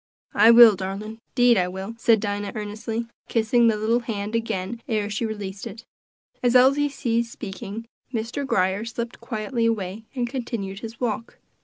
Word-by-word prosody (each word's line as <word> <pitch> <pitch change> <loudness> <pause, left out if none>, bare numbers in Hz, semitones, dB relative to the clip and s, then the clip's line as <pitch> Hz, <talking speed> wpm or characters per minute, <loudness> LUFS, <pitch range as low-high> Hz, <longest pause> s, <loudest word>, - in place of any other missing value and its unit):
"I 215 +3 +6
will, 230 -2 +9
darlin', 200 +4 -5 0.2
'deed 245 -3 +5
I 180 - +1
will," 190 +4 -6
said 225 -1 +4
Dinah 205 -1 -3
earnestly, 220 +2 -4 0.2
kissing 230 +1 +3
the 220 -2 +3
little 225 +3 +2
hand 215 -3 -4
again 225 -1 -2
ere 210 -2 -1
she 220 +2 -1
released 200 -3 -6
it. 230 +1 -10 0.6
As 245 0 +2
Elsie 275 +3 +5
ceased 235 -4 -1
speaking, 210 +1 -7 0.3
Mr. 235 +4 -3
Grier 190 -5 +1
slipped 230 +1 -5
quietly 230 0 -1
away, 215 -1 -2
and 245 -2 -1
continued 230 -6 -4
his 225 +1 -8
walk. 230 -1 -3
225 Hz, 160 wpm, -24 LUFS, 205-235 Hz, 0.6 s, will